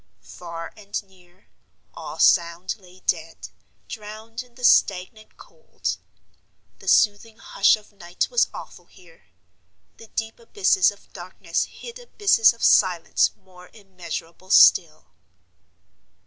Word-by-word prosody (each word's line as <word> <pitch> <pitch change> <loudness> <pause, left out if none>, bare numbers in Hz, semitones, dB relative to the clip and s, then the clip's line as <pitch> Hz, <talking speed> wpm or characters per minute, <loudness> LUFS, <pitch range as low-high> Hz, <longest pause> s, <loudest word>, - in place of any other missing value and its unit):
Far 170 -1 -9
and 205 -1 -6
near, 185 -1 -25 0.5
all - - -9
sound 170 +1 +2
lay 185 -2 -19
dead, 160 - -3 0.4
drowned 220 +1 -8
in 245 -1 -19
the 250 - -14
stagnant 200 -1 +1
cold. 485 - -6 0.8
The - - -15
soothing 215 +1 +2
hush 200 - +2
of 215 0 -18
night 175 -3 -4
was 485 -1 +3
awful - - -11
here. 485 - -21 0.7
The 225 - -14
deep 225 +1 -5
abysses 195 -5 +2
of 205 - -14
darkness 175 -1 -4
hid 475 0 -11
abysses 410 - +3
of 230 - -11
silence 180 -4 +3
more 180 -1 -18
immeasurable 185 -3 -9
still. 160 -4 +5
195 Hz, 120 wpm, -23 LUFS, 175-225 Hz, 0.8 s, still